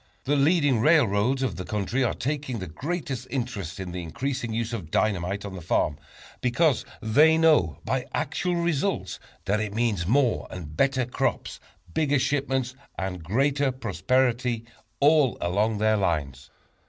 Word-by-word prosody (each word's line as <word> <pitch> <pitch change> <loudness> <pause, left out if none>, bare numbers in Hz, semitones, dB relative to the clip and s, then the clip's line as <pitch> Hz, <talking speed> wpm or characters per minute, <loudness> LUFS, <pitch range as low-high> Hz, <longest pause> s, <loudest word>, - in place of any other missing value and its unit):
The 145 - +1
leading 145 -3 +3
railroads 130 -2 +3
of 110 -10 -2
the 90 - -4
country 105 +7 -1
are 120 - 0
taking 140 -2 -3
the 95 - -5
greatest 130 - -4
interest 115 - -4
in 95 -2 -5
the 90 0 -4
increasing 125 - -3
use 115 +1 -2
of 95 -9 -5
dynamite 100 +1 0
on 100 - -6
the 95 - -7
farm, 75 -3 0 0.4
because 130 +3 +2 0.2
they 150 +9 +5
know 155 - +4
by - - -1
actual 180 -1 -1
results 170 +2 -1 0.3
that 100 +2 +1
it 105 -1 -3
means 110 -7 0
more 125 +1 +2
and 75 -4 -8
better 135 - +2
crops, 125 - -2 0.3
bigger 145 -2 +2
shipments 135 -2 0 0.2
and 90 -3 -4
greater 135 - +1
prosperity 125 +1 0 0.3
all 145 -3 +4
along 105 +5 0
their 110 +1 +2
lines. 70 -9 -2
120 Hz, 150 wpm, -26 LUFS, 100-140 Hz, 0.4 s, they